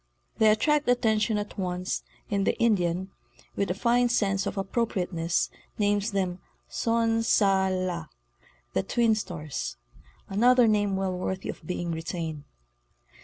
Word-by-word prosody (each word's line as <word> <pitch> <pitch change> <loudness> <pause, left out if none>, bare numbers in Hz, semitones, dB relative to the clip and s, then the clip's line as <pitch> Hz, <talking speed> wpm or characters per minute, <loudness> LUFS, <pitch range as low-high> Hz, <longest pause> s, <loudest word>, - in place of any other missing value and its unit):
They 220 - +6
attract 295 +6 +2
attention 220 -3 +2
at 205 0 -5
once 180 0 -2 0.3
and 200 -1 +1
the - - +1
Indian, 190 -4 +1 0.4
with 200 -2 0
a 180 - 0
fine 240 +3 +2
sense 195 -4 +1
of - - -4
appropriateness, 190 -5 -1 0.3
names 205 0 +1
them 185 -2 -1 0.2
" - - -42 0.2
Son 230 -1 +2
sa 195 -4 +3
la"—the 155 - -5
'"' - - -23
Twin 235 -2 +4
Stars"; 170 - -4 0.5
another 240 +4 +5
name 205 -2 +2
well 190 -1 -1
worthy 185 +1 -3
of - - -6
being 175 -1 -2
retained. 160 -2 -4
195 Hz, 135 wpm, -27 LUFS, 180-220 Hz, 0.5 s, They